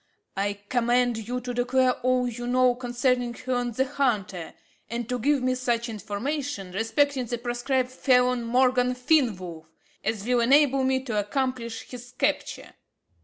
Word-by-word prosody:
I 200 +1 0
command 240 -2 +1
you 250 +1 -2
to 245 0 -5
declare 250 +1 +2
all 250 0 +1
you 240 0 -5
know 250 0 +4
concerning 245 0 -1
Herne 245 -2 -2
the 265 +4 +1
Hunter, 215 - -2 0.3
and 235 -1 -3
to 250 +1 -2
give 280 +2 +2
me 255 0 +2
such 240 -2 -1
information 220 0 -4
respecting 255 +6 +1
the 240 - -2
proscribed 250 +2 -1
felon, 250 -2 +2
Morgan 250 +1 +2
Fenwolf, 205 - 0 0.4
as 215 -1 -2
will 245 0 +2
enable 270 +2 +4
me 260 0 +1
to 225 -5 -1
accomplish 235 +1 -2
his 245 0 -10
capture." 290 +1 -1
245 Hz, 145 wpm, -26 LUFS, 235-255 Hz, 0.4 s, know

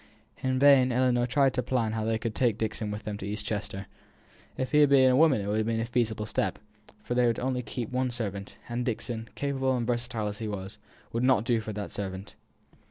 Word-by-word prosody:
In 130 -1 0
vain 135 -2 +6
Ellinor 125 -1 +2
tried 135 +1 +3
to 125 - 0
plan 120 -3 0
how 110 0 -2
they 110 0 +1
could 110 0 -3
take 115 -2 +1
Dixon 110 -1 -2
with 105 +1 -5
them 105 -1 -4
to 100 - -5
East 105 0 -3
Chester. 100 -2 -4 0.7
If 130 - -2
he 150 - +5
had 145 -1 +6
been 130 -2 +6
a - - +4
woman 145 -6 +5
it - - -4
would 105 +1 0
have 110 - 0
been 115 -1 0
a 115 - 0
feasible 115 -3 -1
step; - - -1 0.5
but - - 0
they 125 -1 +4
were 115 - +1
only 130 0 -1
to 110 - -11
keep 120 -3 -4
one 130 0 0
servant, 100 -5 -5
and 120 +1 -2
Dixon, 115 -1 -3
capable 135 -2 0
and 120 - -1
versatile 120 -2 -2
as 105 0 -4
he 110 - -3
was, 100 0 -6 0.3
would 115 - 0
not 125 -4 +4
do 120 -2 +2
for 110 - -5
that 105 0 -5
servant. 95 0 -5
115 Hz, 235 wpm, -28 LUFS, 105-130 Hz, 0.7 s, vain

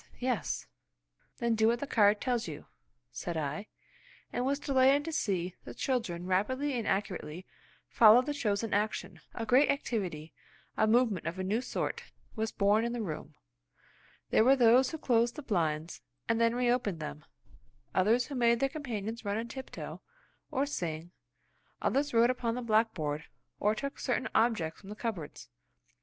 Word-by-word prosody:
Yes!" 250 -3 -2 0.7
"Then 235 -1 +1
do 220 0 +3
what 235 +1 +2
the 285 - -3
card 210 -5 +4
tells 245 -5 -1
you," 150 -3 -7 0.5
said 165 - -4
I, 150 +7 -3 0.7
and 245 - 0
was 275 +2 +1
delighted 275 0 +3
to 325 - -3
see 185 - -1
the - - -9
children 195 -10 -2
rapidly 260 +10 0
and 235 -3 -2
accurately 185 -3 -2 0.4
follow 230 +2 +7
the 295 +2 -2
chosen 215 -5 -1
action. 210 +2 -1
A 230 - -3
great 255 +6 +5
activity, 180 - -2 0.4
a 220 - +3
movement 225 -6 +2
of 170 +2 -3
a 190 - -2
new 210 +5 0
sort, - - -3 0.3
was 220 -1 -2
born 205 +2 +3
in 235 0 -1
the 240 - -2
room. 160 -6 -6 1.0
There - - +5
were 265 +3 +6
those 250 +1 +5
who 320 - -5
closed 235 -4 +2
the 300 - -7
blinds, 165 - -1 0.3
and 230 0 +1
then 230 0 +3
reopened 240 -7 +1
them; 75 - -6 0.7
others 220 +6 +3
who 290 - -8
made 235 -2 +3
their 275 +1 +2
companions 235 -6 -5
run 205 0 -1
on 230 +1 -4
tiptoe, 265 +1 -7 0.5
or 280 -2 0
sing; 170 - -4 0.7
others 285 +2 +1
wrote 235 +1 +5
upon 235 -2 -2
the 250 - -4
blackboard, 215 -10 0 0.3
or 210 +1 +2
took 280 +5 -5
certain 255 -1 -1
objects 220 -9 +1
from 195 - -12
the 210 - -6
cupboards. 200 - -5
225 Hz, 165 wpm, -31 LUFS, 195-250 Hz, 1.0 s, follow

